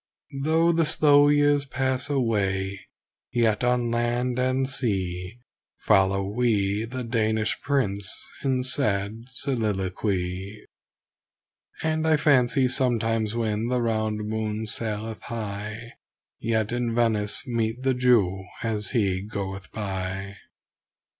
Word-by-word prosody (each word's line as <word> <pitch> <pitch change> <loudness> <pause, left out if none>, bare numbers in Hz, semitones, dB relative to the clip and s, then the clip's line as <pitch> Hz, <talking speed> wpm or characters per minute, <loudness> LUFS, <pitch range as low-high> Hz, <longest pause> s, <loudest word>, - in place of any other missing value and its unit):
Though 160 +3 +3
the 165 0 +2
slow 145 -1 +5
years 145 -1 +4
pass 130 0 -1
away, 100 -7 0 0.4
yet 115 -2 +2
on 125 -1 +1
land 120 +1 0
and 130 +1 +1
sea, 95 -6 -1 0.4
Follow 95 -1 +3
we 105 -2 +1
the 125 +2 -5
Danish 110 -2 0
Prince 100 -9 0 0.3
in 130 -2 +1
sad 110 -4 -1
soliloquy; 100 -6 -2 1.2
And 160 0 0
I 155 -1 +5
fancy 135 -2 +3
sometimes 115 -4 0
when 110 -1 -1
the 125 0 +1
round 110 -2 -1
moon 110 0 -2
saileth 110 0 -3
high 110 +1 -6 0.5
Yet 110 -1 0
in 120 -1 -1
Venice 110 -3 +1
meet 115 0 -2
the 135 0 +3
Jew 115 -7 +3 0.2
as 110 -2 -2
he 100 -6 +1
goeth 95 -2 -6
by. 95 -1 -4
115 Hz, 110 wpm, -25 LUFS, 100-125 Hz, 1.2 s, slow